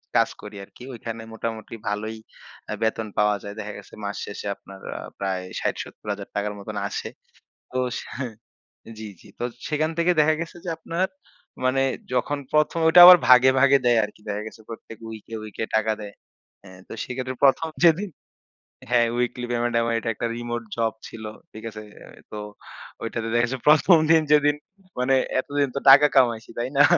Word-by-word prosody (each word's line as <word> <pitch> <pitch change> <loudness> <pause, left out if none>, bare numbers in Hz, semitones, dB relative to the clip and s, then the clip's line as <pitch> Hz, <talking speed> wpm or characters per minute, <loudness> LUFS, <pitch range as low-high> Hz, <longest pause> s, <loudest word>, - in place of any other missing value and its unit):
কাজ - - +4
করি 105 0 -10
আরকি। 110 - -15
ওইখানে 115 -1 -6
মোটামুটি 110 0 -5
ভালোই 110 +2 -3 0.5
আ - - -1
বেতন 110 0 0
পাওয়া 105 0 +3
যায়। 100 - -7
দেখা 105 0 -5
গেছে 105 - -14
মাস 100 0 -3
শেষে 100 0 -7
আপনার 95 0 -14 0.2
আ - - -6 0.2
প্রায় 95 -1 -2 0.2
৬০,০০০-৭০,০০০ 100 -1 -4
টাকার 105 0 -1
মতন 105 +1 -7
আসে। 105 - -4 0.6
তো 130 - -3 0.2
সা - - -11 0.9
জি, 110 - -6
জি। - - -17
তো - - -3 0.2
সেখান 155 +1 0
থেকে 170 +1 +3
দেখা 155 +1 +4
গেছে 165 +1 -6
যে - - -6
আপনার 165 +3 -1 0.6
মানে 130 +1 +2 0.3
যখন 125 +4 0
১ম, 150 +2 +2
ওইটা 160 +2 +8
আবার 180 0 +11
ভাগে, 130 +1 +8
ভাগে 140 0 +6
দেয় 120 -1 +4
আরকি। 105 0 -10
দেখা 105 0 -2
গেছে 110 - -10
প্রত্যেক 115 -1 -10
উইকে, 110 0 -9
উইকে 110 +1 -5
টাকা 110 0 +2
দেয়। 105 -1 -8 0.5
অ্যা 95 - -14 0.2
তো - - -8
সেক্ষেত্রে 130 +1 -4
১ম, 140 +4 +4 0.2
যেদিন 175 +4 +4 0.8
হ্যাঁ, 120 -1 +4
উইকলি 125 0 -1
পেমেন্ট 120 0 0
আমার 115 0 0
এটা 115 - -3
একটা 115 - -3
রিমোট 120 0 -4
জব 115 -1 0
ছিল। 110 -1 -10 0.3
ঠিক 110 - -11
আছে? 110 0 -9 0.5
তো 105 - -6 0.6
ঐটাতে 115 0 -3
দেখা 120 0 +3
গেছে 130 +2 -4
১ম, 155 +4 +7
দিন 165 -1 +6
যেদিন 145 -1 +5 0.4
মানে 130 +2 +3 0.2
এতদিন 145 +1 0
তো - - 0
টাকা 140 +2 +9
কামাইছি, 120 -4 +3
তাই 120 +2 -2
না? 145 - +8
120 Hz, 175 wpm, -24 LUFS, 110-140 Hz, 0.9 s, আবার